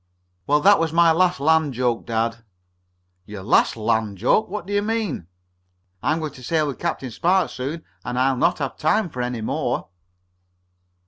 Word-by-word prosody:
"Well, 150 +1 +3
that 200 +4 +6
was 165 -1 0
my 170 0 +5
last 180 0 +2
land 155 -2 +2
joke, 120 -1 -1
dad." 115 0 -1 0.9
"Your 105 -2 -8
last 110 - +3
land 110 -2 0
joke? 125 - +2
What 210 -5 -5
do 200 - -5
you 205 - +2
mean?" 210 - -2 0.7
"I'm 155 - +1
going 155 -2 -4
to 130 - -13
sail 155 +4 +1
with 140 -3 -5
Captain 150 -7 -3
Spark 180 - +1
soon, 145 +6 -5 0.2
and 125 0 -4
I'll 130 +1 +2
not 125 - +2
have 135 -3 -4
time 190 +5 +1
for 125 - -4
any 125 -2 -3
more." 110 - -2
145 Hz, 175 wpm, -22 LUFS, 125-170 Hz, 0.9 s, that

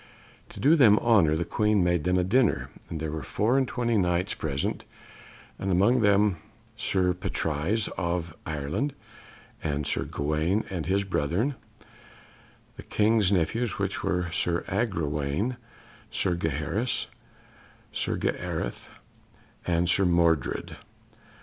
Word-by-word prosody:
To - - -11
do 150 +4 +5
them 115 -9 +6
honour 100 -11 +4
the 85 - -1
Queen 105 -3 +2
made 90 -2 +1
them 90 0 +2
a 90 - +2
dinner; 115 +4 +2 0.2
and 80 - -4
there 80 -1 -3
were 80 0 -4
four 110 - 0
and 130 - +1
twenty 120 -3 0
Knights 90 +2 +1
present, 70 -3 -2 0.8
and 95 - -2
among 100 +8 +4
them 100 -2 +3 0.4
Sir 90 -2 +1
Patrise 90 +4 -1
of 85 -2 -2
Ireland, 80 - -2 0.7
and 75 -2 -1
Sir 75 - -1
Gawaine 75 +8 0
and 90 -5 -3
his 100 +2 +2
brethren, 95 - 0 1.2
the - - -7
King's 110 -2 +2
nephews, 100 +6 0
which - - -2
were 90 0 -1
Sir 85 +1 0
Agrawaine, 90 - -1 0.5
Sir 90 - 0
Gaheris, 80 - -1 0.9
Sir - - -1
Gareth, - - -3 0.8
and 85 0 +2
Sir 95 +3 +3
Mordred. 85 -6 +1
90 Hz, 125 wpm, -27 LUFS, 80-105 Hz, 1.2 s, them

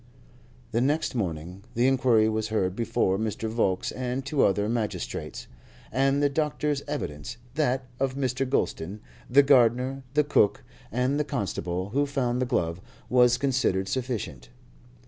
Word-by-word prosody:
The 115 +1 +1
next 145 +5 +1
morning 90 -4 -3
the 120 +2 +3
inquiry 125 -4 +4
was 110 0 -1
heard 95 -4 0
before 100 -4 +1
Mr. 110 0 -2
Volkes 110 -5 0
and 130 +1 -3
two 140 0 +2
other 100 +1 +2
magistrates, 115 -2 -3 0.5
and 135 +3 +2
the - - +5
doctor's 150 0 -1
evidence, 115 - -4 0.2
that 130 -3 0
of 135 -1 0
Mr. 130 -1 -1
Gulston, 100 -6 -1 0.3
the 140 +3 +6
gardener, 130 0 +3
the 150 - +5
cook, 125 -8 +2 0.3
and 125 +5 +1
the - - +2
constable 95 -7 -3
who 140 +6 +1
found 125 -3 0
the 130 - 0
glove, 85 -8 -1 0.3
was 125 -1 +5
considered 125 -8 +1
sufficient. 105 - -3
125 Hz, 145 wpm, -27 LUFS, 105-135 Hz, 0.5 s, the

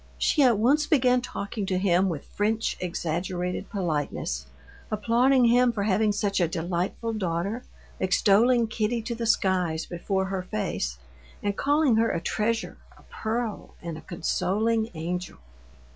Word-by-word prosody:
She 300 - +2
at 245 -5 +5
once 280 +8 +3
began 250 -5 +3
talking 205 -4 -4
to 185 - 0
him 185 0 +3
with 155 -5 -4
French 220 +2 -1
exaggerated 180 +1 -3
politeness, 150 - -2 0.4
applauding 240 +4 +3
him 245 +1 +5
for 210 -3 -2
having 210 +1 +2
such 200 -2 0
a 175 - +3
delightful 175 +7 -2
daughter, 195 +4 -2 0.4
extolling 215 +6 +4
Kitty 220 +1 -1
to 235 +1 -3
the 230 0 -3
skies 180 -6 +1
before 190 +2 -2
her 190 -1 -2
face, 65 - -3 0.5
and 205 -1 0
calling 285 -3 +3
her 230 0 +3
a - - -1
treasure, 225 +6 -1 0.2
a - - -19
pearl, 225 0 -3
and 170 -2 -6
a - - -9
consoling 220 +6 0
angel. 175 - -4
205 Hz, 145 wpm, -26 LUFS, 180-230 Hz, 0.5 s, at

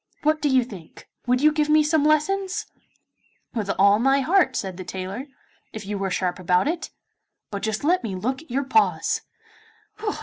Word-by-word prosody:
What 310 +1 +2
do 295 - +2
you 260 -2 +4
think? 195 -9 -12 0.2
Would 250 +1 +2
you 305 +1 +5
give 300 0 0
me 305 0 +5
some 300 0 +2
lessons?' 385 +7 +1 0.9
'With 215 -5 -3
all 200 +2 +5
my 270 +3 +3
heart,' 360 +7 +3
said 190 -3 -3
the 185 - -6
tailor, 190 +8 -6 0.5
'if 215 -2 -7
you 200 0 -3
are 195 - 0
sharp 180 -1 -1
about 180 +6 +2
it. 335 +2 -2 0.6
But 200 -1 -4
just 220 +2 -2
let 350 +2 +2
me 205 -5 -3
look 255 +9 -2
at 320 - -19
your 270 +3 0
paws. 435 +11 +2
260 Hz, 180 wpm, -24 LUFS, 200-305 Hz, 0.9 s, you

